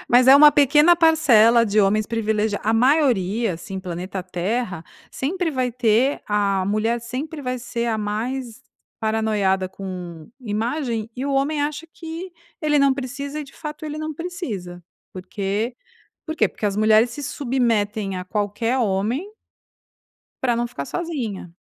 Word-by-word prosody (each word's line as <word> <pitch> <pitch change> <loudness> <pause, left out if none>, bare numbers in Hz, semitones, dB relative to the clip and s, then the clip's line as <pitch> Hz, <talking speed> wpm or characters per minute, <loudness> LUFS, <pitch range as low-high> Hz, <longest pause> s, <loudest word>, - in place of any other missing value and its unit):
mas 245 +1 +5
é 265 - +9
uma 295 +1 +9
pequena 295 +4 +5
parcela 240 -9 +5
de 210 +1 0
homens 210 +2 +2
privilegiados, 220 -2 -1
a 220 - +3
maioria 230 - +2
assim 190 +3 -7
planeta 185 +1 -5
terra, 185 +2 -3 0.3
sempre 340 +5 -2
vai 255 -3 -1
ter 245 +3 +2
a 200 -2 +1
mulher 215 +4 0
sempre 280 +6 -5
vai 255 0 -2
ser 235 -1 -4
a 225 -2 0
mais 235 +4 -4 0.4
paranoica 215 -4 0
com 180 -3 -8
imagem 230 +1 -2
e 260 +3 -4
o 280 - -1
homem 290 +2 +1
acha 300 +2 -3
que 330 +2 -8 0.3
ele 300 -1 +3
não 275 -1 +4
precisa 280 +3 -5
e - - -6
de 275 - -16
fato 300 0 -7
ele 305 0 -5
não 310 0 -4
precisa, 245 - -6 0.3
por 185 -1 -9
quê? 205 +5 -2 0.5
Por 315 - -3
quê? - - +3
Porque 210 - -4
as 200 - -1
mulheres 215 +2 +4
se 290 +5 -7
submetem 220 -8 -1
a 180 - -5
qualquer 210 +5 -1
homem 230 - -1 1.1
pra 240 -3 +2
não 240 - 0
ficar 140 -11 -6
sozinha. 230 - -5
235 Hz, 155 wpm, -22 LUFS, 205-280 Hz, 1.1 s, é